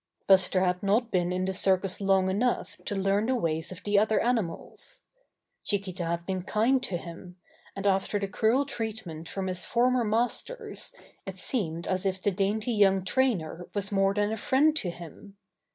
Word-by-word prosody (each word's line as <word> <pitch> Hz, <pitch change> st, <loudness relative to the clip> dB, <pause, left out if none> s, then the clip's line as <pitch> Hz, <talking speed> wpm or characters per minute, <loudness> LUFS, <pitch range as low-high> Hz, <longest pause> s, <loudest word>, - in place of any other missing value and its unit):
Buster 185 Hz, -1 st, +5 dB
had 180 Hz, 0 st, +1 dB
not 220 Hz, +4 st, +1 dB
been 175 Hz, -1 st, +1 dB
in 185 Hz, 0 st, -1 dB
the 190 Hz, -, -1 dB
circus 190 Hz, 0 st, +1 dB
long 195 Hz, -1 st, +3 dB
enough 220 Hz, +6 st, 0 dB
to 205 Hz, -, -2 dB
learn 195 Hz, +2 st, +1 dB
the 260 Hz, -, +2 dB
ways 165 Hz, -7 st, -2 dB
of 185 Hz, +1 st, -9 dB
the 205 Hz, -1 st, +3 dB
other 215 Hz, +1 st, +2 dB
animals. 225 Hz, -9 st, -3 dB, 0.6 s
Chiquita 190 Hz, -3 st, -2 dB
had 170 Hz, +1 st, -2 dB
been 185 Hz, -1 st, -2 dB
kind 225 Hz, +7 st, +2 dB
to 185 Hz, -8 st, -2 dB
him, 175 Hz, +2 st, -10 dB, 0.4 s
and 195 Hz, -, -5 dB
after 195 Hz, +1 st, +2 dB
the 200 Hz, -1 st, -2 dB
cruel 225 Hz, +7 st, +2 dB
treatment 210 Hz, -, -5 dB
from 195 Hz, -1 st, -3 dB
his 185 Hz, -1 st, -3 dB
former 250 Hz, +1 st, +2 dB
masters 245 Hz, -, -2 dB, 0.4 s
it -, -, -6 dB
seemed 170 Hz, -, -2 dB
as 185 Hz, +1 st, -1 dB
if 190 Hz, 0 st, -1 dB
the 205 Hz, -, +1 dB
dainty 210 Hz, +5 st, 0 dB
young 195 Hz, -3 st, +3 dB
trainer 185 Hz, -8 st, 0 dB
was 205 Hz, 0 st, -1 dB
more 195 Hz, 0 st, +2 dB
than 205 Hz, 0 st, +1 dB
a 220 Hz, -, -2 dB
friend 285 Hz, +8 st, +3 dB
to 185 Hz, -, -1 dB
him. 175 Hz, +4 st, -10 dB
195 Hz, 180 wpm, -28 LUFS, 185-220 Hz, 0.6 s, Buster